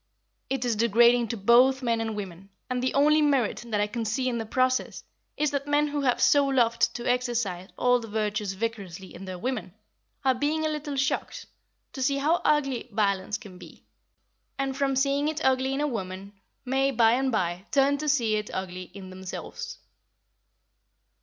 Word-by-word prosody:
It 265 -2 -1
is 235 -2 +1
degrading 235 +2 +4
to 230 - -4
both 250 +6 +4
men 230 -2 +1
and 225 -1 -3
women, 195 -2 -7 0.2
and 250 0 0
the 255 - -1
only 300 +2 +5
merit 275 -7 +1
that 215 -3 -1
I 205 - +3
can 225 +2 -4
see 235 +4 -1
in 240 -2 -1
the 225 - -5
process 255 +2 0 0.3
is, 300 -1 +1
that 280 0 -2
men 295 +1 +2
who 290 0 -2
have 250 -3 +1
so 285 -1 +5
loved 235 -4 +2
to 240 - -4
exercise 235 -7 -1
all 250 0 +3
the 230 - -8
virtues 210 -2 -2
vicariously 190 -3 -5
in 190 - -9
their 185 -1 -6
women, 220 -3 -4 0.5
are 260 - +5
being 300 +5 -1
a - - +1
little 300 -2 -4
shocked 270 0 -2 0.5
to 265 - -6
see 275 +1 +1
how 310 +5 +1
ugly 275 -5 +1
violence 200 -1 0
can 190 -6 -13
be, - - -14 0.7
and, 270 -1 -2
from 270 0 0
seeing 280 +2 +1
it 310 0 -2
ugly 260 0 +2
in 270 +2 -1
a - - +1
woman 195 -5 -5 0.3
may, 270 +2 +1
by 230 -4 +4
and 260 +2 +1
by, 185 -2 -2
turn 280 0 +3
to 305 0 -1
see 230 -7 +2
it 210 - -4
ugly 185 -1 -5
in 190 -2 -9
themselves. 185 0 -7
240 Hz, 185 wpm, -27 LUFS, 210-275 Hz, 0.7 s, only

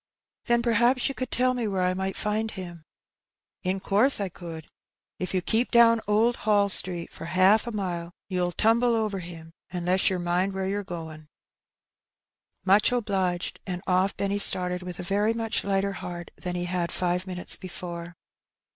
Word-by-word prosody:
'* - - -59
"Then 235 -1 +2
perhaps 240 +2 +2
you - - -4
could 255 -1 -5
tell 255 +1 +2
me 240 -3 -2
where 190 -2 -1
I 180 0 +1
might 190 +1 -3
find 215 +1 -1
him.'' 175 -6 -9 0.3
" - - -65
'' - - -59
In 195 - -3
course 210 +8 +4
I 200 -2 -2
could* 165 -3 -9 0.5
If 185 - -3
you 185 - 0
keep 230 +5 +1
down 230 -1 +5
Old 220 +3 +2
Hall 205 -2 +2
Street 180 -3 +2
for - - -9
haaf 190 +6 +3
a - - -3
mile, 175 -5 -4 0.2
you'll 180 -2 -1
tumble 230 +5 +2
over 215 -3 -1
him, 165 -2 -10 0.2
unless 180 +1 +1
yer 190 - -1
mind 180 +2 -1
wheie 190 0 -2
yer 205 +1 -2
goin'." 160 -4 -8 0.7
'* - - -52
Much 200 +5 +4
obliged." 195 -7 -1
And 180 0 -4
off 185 +2 +1
Benny 200 0 -1
started 180 -2 +5
with 180 -1 -7
a - - -4
very 205 +5 +1
much 225 -1 -2
lighter 195 0 0
heart 175 -2 -7
than 180 -1 -5
he 175 0 -2
had 175 -1 -2
five 180 +1 -1
minutes 180 -1 +2
before. 170 -2 -8
190 Hz, 185 wpm, -26 LUFS, 180-215 Hz, 0.7 s, down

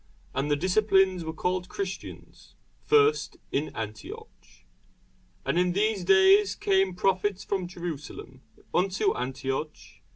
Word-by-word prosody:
And 140 +2 -1
the 145 - +3
disciples 190 +1 +2
were 160 - -4
called 180 +2 -2
Christians 195 -1 -7 0.3
first 440 0 +3
in 145 +3 -1
Antioch. 110 -1 -7 1.1
And 175 - +1
in 180 0 +2
these 205 0 +1
days 195 +2 +5
came 190 -2 +1
prophets 195 +1 0
from 190 -3 -2
Jerusalem 170 -4 -7 0.3
unto 185 +1 +1
Antioch. 135 +4 -3
185 Hz, 110 wpm, -27 LUFS, 160-195 Hz, 1.1 s, days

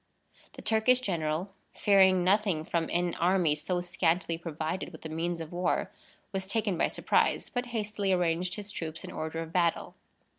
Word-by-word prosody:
The - - -11
Turkish 225 +3 +4
general, 175 -3 -2 0.2
fearing 190 -3 +5
nothing 190 -4 +2
from 165 -1 -1
an 175 0 0
army 175 -3 +3
so 175 +4 -1
scantily 175 -1 +1
provided 165 +1 -4
with 160 - -12
the 160 - -5
means 165 +2 -2
of 160 -1 -7
war, 180 +1 0 0.4
was 190 -1 -3
taken 210 -2 0
by - - +2
surprise, - - +1
but 245 0 -2
hastily 210 -4 -2
arranged 180 0 +1
his 210 -1 -4
troops 165 -4 -5
in - - -7
order 160 +1 -4
of 165 0 -11
battle. 170 -2 +1
180 Hz, 170 wpm, -29 LUFS, 165-195 Hz, 0.4 s, fearing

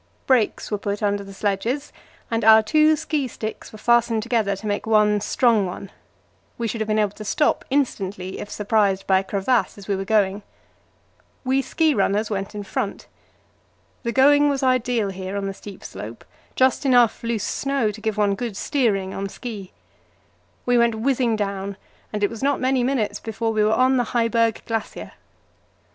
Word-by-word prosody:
Brakes 245 -5 +1
were 210 - -1
put 205 +1 -3
under 205 -1 0
the 195 - -11
sledges, 210 +8 -2 0.4
and 225 0 0
our 220 0 +7
two 310 +6 +4
ski 295 -2 -2
sticks 220 -2 -7
were 215 - -11
fastened 235 -1 +2
together 225 -4 0
to 195 - -10
make 205 +1 -2
one 210 -1 +3
strong 220 -2 +2
one; 190 +2 -8 0.7
we 235 - -2
should 225 0 -4
have 220 - -1
to 215 - +1
be - - +2
able 205 -2 0
to 215 - -10
stop 295 +9 +1
instantly 195 -9 -2
if 210 - -7
surprised 205 -2 +1
by 190 -1 +4
a - - -4
crevasse 205 +6 0
as 200 - -12
we 200 - 0
were 190 - -3
going. 200 -1 +1 1.0
We 265 +1 +2
ski 315 +2 +1
runners 210 +1 0
went 195 +1 -3
in 205 - -4
front. 205 0 -4 1.0
The 235 - -2
going 290 +3 +5
was 275 -1 -1
ideal 245 -4 +1
here 190 +1 -5
on 200 - -2
the 195 - -3
steep 200 0 -11
slope, 110 +3 -9 0.3
just 260 0 +2
enough 245 -4 +4
loose 230 -3 -1
snow 275 -2 0
to 215 +1 -11
give 220 -1 -2
one 205 -1 +2
good 215 0 -4
steering 205 -10 0
on 195 0 -4
ski. 205 -4 -8 0.9
We 245 -1 +3
went 235 -1 +3
whizzing 240 0 +1
down, 200 -1 -3 0.3
and 210 -1 -3
it 205 - +3
was 230 - -8
not 280 +1 +1
many 260 -1 +1
minutes 245 -5 -1
before 225 0 -3
we 215 -1 +2
were 215 - +3
on 255 +3 +3
the 245 -1 -1
Heiberg 230 -1 +1
Glacier. 225 -1 -4
220 Hz, 185 wpm, -22 LUFS, 200-245 Hz, 1.0 s, our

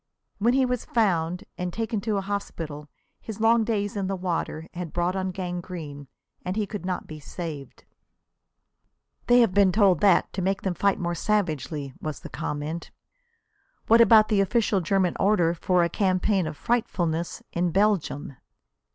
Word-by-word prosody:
When 235 +5 +3
he 265 -1 +4
was 250 -1 -2
found 180 -5 0 0.2
and 180 0 -2
taken 225 +1 -2
to 215 -1 -1
a - - 0
hospital 165 -7 -5 0.3
his 220 -1 -8
long 225 +1 +4
days 210 -2 -1
in 195 -2 -2
the 195 - -1
water 170 -3 -3
had 175 -2 -6
brought 175 +1 0
on 190 0 -1
gangrene 175 -6 -6 0.4
and 180 +1 -3
he 215 -1 0
could 200 -3 -6
not 185 - -2
be 155 -1 -9
saved. 150 -3 -7 1.4
"They 245 0 +6
have 225 -6 +3
been 200 -1 +5
told 190 -4 +4
that 200 - +4
to 190 - -3
make 195 +2 -1
them 190 - 0
fight 195 +3 +1
more 175 -1 -2
savagely," 155 -8 -1
was 155 -3 -5
the - - -9
comment. 150 +3 -4 1.0
"What 230 +1 +6
about 220 -1 +6
the 205 -3 +3
official 205 -1 +1
German 180 +1 +1
order 185 -5 +3
for 180 +1 +1
a - - +2
campaign 190 -1 +1
of 155 -1 -6
'frightfulness' 175 -8 -1
in 175 +1 +1
Belgium?" 180 -8 0
185 Hz, 165 wpm, -25 LUFS, 170-210 Hz, 1.4 s, They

